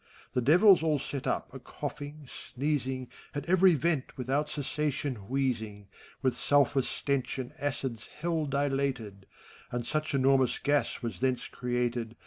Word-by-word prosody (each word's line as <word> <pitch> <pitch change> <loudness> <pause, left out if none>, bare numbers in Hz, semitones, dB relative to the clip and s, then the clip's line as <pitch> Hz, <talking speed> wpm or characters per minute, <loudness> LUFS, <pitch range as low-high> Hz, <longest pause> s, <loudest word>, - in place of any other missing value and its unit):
The 125 - +1
Devils 180 - +7
all 155 -2 +2
set 140 0 -5
up - - -1
a - - -7
coughing, 145 0 -7
sneezing, 130 -1 -2 0.3
At 145 0 -3
every 185 0 +5
vent 150 -1 -1
without 135 +4 0
cessation 145 -6 -2
wheezing: 110 -7 -1 0.3
With 130 -2 +2
sulphur 140 -1 +4
stench 140 +1 -2
and 130 0 -5
acids 135 -5 -3
Hell 165 -1 0
dilated. 135 -8 -1 0.4
And 120 -1 -2
such 155 +4 -1
enormous 130 -2 +3
gas 145 -2 0
was 110 -7 -4
thence 130 -2 0
created. 120 -2 -2
135 Hz, 135 wpm, -30 LUFS, 125-145 Hz, 0.4 s, Devils